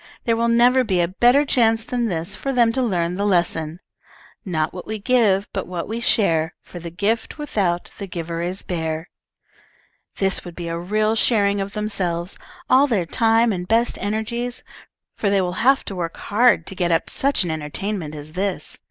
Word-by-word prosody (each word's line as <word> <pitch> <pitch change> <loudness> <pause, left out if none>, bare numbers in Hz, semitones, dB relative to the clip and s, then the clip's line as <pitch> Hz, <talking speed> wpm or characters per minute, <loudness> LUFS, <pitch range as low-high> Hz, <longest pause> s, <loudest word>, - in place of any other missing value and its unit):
There 230 - +2
will 230 +1 +1
never 245 +2 +4
be 190 -6 0
a 170 - +3
better 245 +10 +4
chance 225 -4 +2
than 245 -4 -1
this 170 -4 -3
for 275 - -3
them 240 -3 +3
to 260 - 0
learn 180 -6 0
the 200 - -1
lesson: 170 -4 0 0.6
"'Not 160 -6 -1
what 180 - -8
we 220 - -3
give, 205 -3 +2
but 195 - -3
what 175 -2 -4
we 225 +2 -3
share, 165 -9 +2
For 175 - -10
the 170 0 -7
gift 205 - -1
without 195 - -1
the 200 - -5
giver 170 -2 -4
is 180 +3 -3
bare.' 160 -1 -3 1.1
"This 195 -1 +1
would 175 -2 -9
be 170 -1 -5
a 165 0 -3
real 215 +5 +1
sharing 205 -3 +2
of 195 +1 -5
themselves, 190 -5 -1 0.3
all 265 +3 +5
their 210 -9 0
time 225 +3 +3
and 180 -1 -4
best 230 +3 +2
energies, 225 +4 -3 0.5
for 205 - 0
they 200 0 +3
will 180 -1 -1
have 270 0 +4
to 195 - -5
work 170 -2 -4
hard 210 -5 +3
to - - -6
get 175 -2 0
up 165 0 +1
such 275 -6 +2
an 170 - -2
entertainment 160 +2 -4
as 150 +1 -9
this. 190 +1 -3
200 Hz, 190 wpm, -22 LUFS, 175-230 Hz, 1.1 s, all